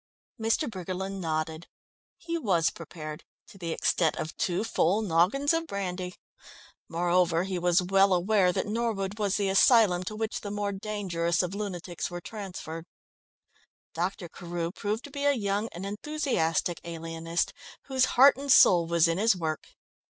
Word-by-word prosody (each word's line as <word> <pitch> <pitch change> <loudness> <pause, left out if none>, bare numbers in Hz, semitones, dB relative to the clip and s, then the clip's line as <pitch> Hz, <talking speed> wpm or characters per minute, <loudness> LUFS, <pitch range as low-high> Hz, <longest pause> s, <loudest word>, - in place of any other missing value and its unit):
Mr. 225 +7 +1
Briggerland 190 -1 -5
nodded. 160 0 -3 0.5
He 335 0 -4
was 185 - +2
prepared 155 -2 -8 0.2
to 205 -5 -16
the 170 -2 -4
extent 160 0 +1
of 155 - -5
two 180 +3 -1
full 215 -2 +1
noggins 205 - +2
of 330 0 -1
brandy. 180 - -4 0.7
Moreover, 175 0 +2
he 190 -1 -3
was 175 +1 +3
well 195 +2 +4
aware 185 +1 +3
that - - -1
Norwood 210 -2 -2
was 205 -2 +1
the 200 -1 0
asylum 195 -2 +5
to 215 - -5
which 220 0 -3
the 205 - -5
more 205 0 -2
dangerous 190 -5 -1
of 180 +1 -3
lunatics 185 -4 -4
were 175 -1 -5
transferred. 175 -5 -7 1.1
Dr. 180 +1 -3
Carew 170 0 -5
proved 210 +4 -3
to 285 - -10
be 285 0 -3
a 285 - +5
young 205 -2 -1
and 175 +3 -7
enthusiastic 200 - -1
alienist 165 0 -3 0.3
whose 260 -1 +2
heart 275 +2 +8
and 280 0 -2
soul 175 -8 +7
was 170 0 +3
in 165 +2 0
his 225 0 +4
work. 160 -3 -3
190 Hz, 155 wpm, -28 LUFS, 170-215 Hz, 1.1 s, heart